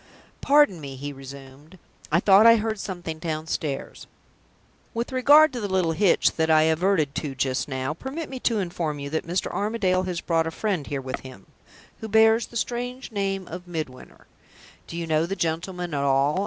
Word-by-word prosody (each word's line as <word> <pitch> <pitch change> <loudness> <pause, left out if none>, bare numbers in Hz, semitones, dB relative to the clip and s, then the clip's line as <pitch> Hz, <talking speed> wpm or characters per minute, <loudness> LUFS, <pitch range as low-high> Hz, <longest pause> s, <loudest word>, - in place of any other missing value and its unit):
"Pardon 285 - +4
me," 140 -2 -7
he 145 +2 -6
resumed, 135 +4 -12 0.3
"I 170 - +4
thought 200 +3 +6
I 230 - +9
heard 220 -1 -2
something 175 -5 -5
downstairs. 155 -3 -4 0.9
With 235 +2 -2
regard 290 +4 +6
to 245 - -4
the 205 - -2
little 185 -4 +1
hitch 185 +3 +3
that 160 0 +1
I 155 -1 +5
adverted 160 -2 +1
to 145 -3 -4
just 130 +3 -1
now, 130 +1 -3
permit 270 - -6
me 260 - -7
to 230 -2 +1
inform 170 -5 -2
you 140 0 -6
that 160 +1 -2
Mr. 180 +2 -1
Armadale 200 -3 0
has 180 -2 -3
brought 165 -1 0
a - - -1
friend 175 -3 -2
here 140 -2 -3
with 130 0 -5
him, 130 -7 -12 0.5
who 220 - -6
bears 220 +2 +4
the 235 - -7
strange 245 +2 -4
name 195 -3 -2
of 175 +2 -8
Midwinter. 155 -7 -7 0.6
Do 170 - -7
you 170 - -3
know 160 0 +1
the 195 - -3
gentleman 175 0 -3
at 140 - 0
all?" 140 +4 +2
170 Hz, 185 wpm, -25 LUFS, 150-210 Hz, 0.9 s, I